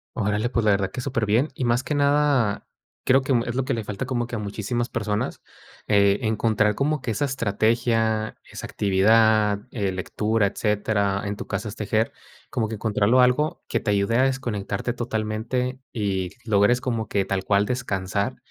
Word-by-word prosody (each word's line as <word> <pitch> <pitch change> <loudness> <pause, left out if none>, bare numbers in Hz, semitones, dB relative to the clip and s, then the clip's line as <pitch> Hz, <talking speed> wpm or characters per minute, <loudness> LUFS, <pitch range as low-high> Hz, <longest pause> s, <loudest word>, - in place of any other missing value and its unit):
Órale, 105 +1 0
pues, 115 -3 0
la 105 - +5
verdad 100 -1 +1
que 125 - -5
superbién 120 +1 +1
y, 130 - -3
más 120 +2 +2
que - - -3
nada, 140 -6 +2 0.4
creo 130 +1 +5
que 130 - -3
mm, 120 -2 +2
es 120 - -3
lo 135 - +1
que - - -1
le 115 - -3
falta 105 +3 -4
como 120 -3 -1
que 120 - -6
a - - -3
muchísimas 110 +4 -3
personas, 105 0 -2 0.5
eh, 100 -1 +4
encontrar 110 -1 +2
como 150 +4 0
que 120 - -2
esa 110 +7 0
estrategia, 115 -3 0
esa - - -7
actividad, 105 +1 +3
eh, 100 -5 -1
lectura, 105 +3 0
etcétera, 100 -1 0
en 100 0 -2
tu - - -7
caso 100 +1 -3
es 105 - -8
tejer, 110 +1 0 0.4
como 115 -2 -1
que 110 - -5
encontrarlo 110 +3 +2
algo 150 +7 +2
que - - 0
te 105 - -1
ayude 100 +3 +1
a 130 - +4
desconectarte 120 -4 -2
totalmente 120 +2 -2
y 95 -5 -1
logres 110 +2 +3
como 115 -4 -2
que 100 - 0
tal 95 -1 -2
cual 100 0 +3
descansar, 100 -1 -2
110 Hz, 180 wpm, -24 LUFS, 100-125 Hz, 0.5 s, la